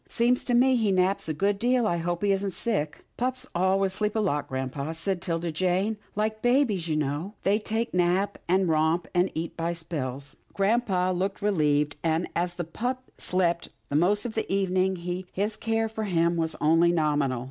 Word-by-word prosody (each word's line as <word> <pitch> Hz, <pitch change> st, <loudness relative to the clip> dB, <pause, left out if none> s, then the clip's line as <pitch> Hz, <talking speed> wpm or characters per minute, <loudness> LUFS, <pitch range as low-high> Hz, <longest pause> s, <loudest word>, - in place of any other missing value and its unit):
"Seems 245 Hz, +2 st, +2 dB
to 245 Hz, -, +1 dB
me 255 Hz, +1 st, +5 dB
he 220 Hz, -4 st, +2 dB
naps 185 Hz, -1 st, +1 dB
a -, -, 0 dB
good 200 Hz, +4 st, +1 dB
deal. 245 Hz, +1 st, +2 dB
I 175 Hz, -5 st, +1 dB
hope 175 Hz, +2 st, -2 dB
he 200 Hz, -, +3 dB
isn't 195 Hz, -1 st, 0 dB
sick." 165 Hz, -11 st, -2 dB
" -, -, -43 dB
Pups 255 Hz, +1 st, -2 dB
always 190 Hz, +2 st, +2 dB
sleep 210 Hz, +2 st, -1 dB
a -, -, +2 dB
lot, 150 Hz, -9 st, 0 dB
grampa," 130 Hz, +4 st, -3 dB
said 180 Hz, +2 st, -2 dB
'Tilda 170 Hz, -1 st, -2 dB
Jane, 185 Hz, +6 st, 0 dB
" -, -, -35 dB
like 215 Hz, +1 st, -1 dB
babies, 245 Hz, -, +2 dB
you 155 Hz, -, 0 dB
know. 150 Hz, +8 st, -2 dB
They 205 Hz, +2 st, +3 dB
just 225 Hz, +2 st, -2 dB
nap, 180 Hz, +3 st, +1 dB
and 185 Hz, +1 st, +3 dB
romp 160 Hz, +2 st, +2 dB
and 180 Hz, +1 st, +3 dB
eat 165 Hz, +1 st, -3 dB
by 165 Hz, +1 st, -1 dB
spells." 145 Hz, -5 st, -4 dB, 0.2 s
Grampa 195 Hz, -3 st, +2 dB
looked 195 Hz, +3 st, -2 dB
relieved, 150 Hz, -7 st, +2 dB
and, 165 Hz, +1 st, +1 dB
as 175 Hz, 0 st, -1 dB
the 175 Hz, -, -3 dB
pup 250 Hz, +10 st, -4 dB
slept 175 Hz, -2 st, 0 dB, 0.2 s
the 140 Hz, -, -2 dB
most 195 Hz, +8 st, +3 dB
of 235 Hz, -, -3 dB
the 220 Hz, -, -3 dB
evening, 190 Hz, -1 st, +1 dB, 0.4 s
his 210 Hz, +3 st, -1 dB
care 225 Hz, 0 st, 0 dB
of 220 Hz, 0 st, -7 dB
him 175 Hz, -6 st, +1 dB
was 160 Hz, -1 st, -1 dB
only 165 Hz, +3 st, +4 dB
nominal. 145 Hz, -6 st, +1 dB
185 Hz, 195 wpm, -27 LUFS, 165-210 Hz, 0.4 s, me